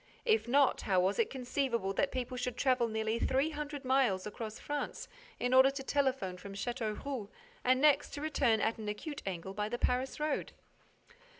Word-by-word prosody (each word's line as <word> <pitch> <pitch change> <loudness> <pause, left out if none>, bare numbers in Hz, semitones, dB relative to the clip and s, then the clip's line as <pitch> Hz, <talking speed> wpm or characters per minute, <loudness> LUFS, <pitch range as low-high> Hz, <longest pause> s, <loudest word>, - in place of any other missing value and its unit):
If 445 - +3
not, 275 +2 +3
how 190 -2 +2
was 190 +4 +1
it 230 - +3
conceivable 250 -6 -1
that 280 - +1
people 255 0 -3
should 250 0 -3
travel 255 -3 +2
nearly 220 +1 -1
three 270 +6 +1
hundred 295 -2 -5
miles 255 -8 +2
across 215 +1 -6
France 290 0 -4 0.3
in 245 +1 0
order 260 +1 +8
to 275 0 -5
telephone 265 -10 0
from 195 +2 -9
Châteauroux 235 +1 -3 0.3
and 255 0 +4
next 295 0 +4
to 290 - -5
return, 270 -8 +2
at 225 +1 0
an 215 -1 -4
acute 280 +8 -5
angle, 190 0 -4
by 210 +1 -2
the 240 - -2
Paris 255 +3 0
road? 300 -1 -1
250 Hz, 180 wpm, -33 LUFS, 215-275 Hz, 0.3 s, order